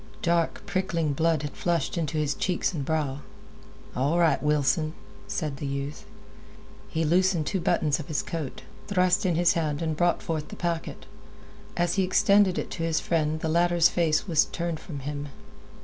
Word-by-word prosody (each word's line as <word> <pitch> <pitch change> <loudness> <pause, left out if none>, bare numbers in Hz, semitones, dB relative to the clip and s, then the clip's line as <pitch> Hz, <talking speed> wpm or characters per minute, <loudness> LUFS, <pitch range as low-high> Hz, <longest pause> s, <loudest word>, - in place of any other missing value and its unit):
Dark, 170 -1 +1
prickling 180 -6 -1
blood 160 +1 +1
had 145 - -3
flushed 170 -5 -1
into 165 -2 -2
his 150 -1 +1
cheeks 180 +3 -1
and 150 -5 -3
brow. 145 -2 -1 0.8
"All 140 +7 +1
right, 170 -2 +3
Wilson," 150 +2 +1 0.3
said 150 -4 -3
the 140 - -4
youth. 140 +1 -4 0.8
He 160 0 -1
loosened 175 0 +2
two 190 - -1
buttons 150 -2 +1
of 155 - -7
his 155 - -1
coat, 160 -5 -5 0.2
thrust 185 0 +2
in 175 - +1
his 175 +1 +4
hand, 155 -3 -1
and 160 -2 -1
brought 175 +2 +1
forth 155 -2 -3
the - - -9
packet. 170 -2 -3 0.7
As 175 +2 +1
he - - +2
extended 190 +1 +4
it - - -3
to 165 - -4
his 165 -1 +1
friend 155 -2 0
the - - -1
latter's 175 +1 +4
face 165 0 +1
was 160 -4 +4
turned 170 -2 -3
from 145 -6 -7
him. 145 +1 -4
165 Hz, 175 wpm, -27 LUFS, 150-175 Hz, 0.8 s, his